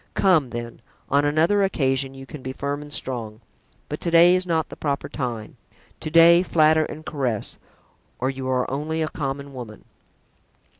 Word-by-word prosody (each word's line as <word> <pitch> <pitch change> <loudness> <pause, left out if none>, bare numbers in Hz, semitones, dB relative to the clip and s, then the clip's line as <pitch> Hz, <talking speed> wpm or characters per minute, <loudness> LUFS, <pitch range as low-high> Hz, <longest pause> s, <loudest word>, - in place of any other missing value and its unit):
Come, 170 -9 +3
then, 120 0 -7 0.3
on 140 +1 +3
another 160 +8 +3
occasion 135 -8 0
you 135 0 -10
can 140 +1 -10
be 130 0 -5
firm 140 +2 -3
and 150 0 -11
strong; 115 -6 -3 0.5
but - - -6
to 170 - -1
day 170 +2 +6
is 185 0 -1
not 165 -2 0
the - - -9
proper 140 -2 -2
time; 120 -6 -5 0.4
to - - -5
day, 165 +2 +7
flatter 155 -3 +3
and 155 +1 -9
caress, 130 -10 -3 0.6
or 130 +2 -1
you 130 -1 -5
are 125 -1 +1
only 155 +4 -2
a 155 - -2
common 140 -2 -5
woman." 120 -4 -9
145 Hz, 170 wpm, -23 LUFS, 130-160 Hz, 0.6 s, day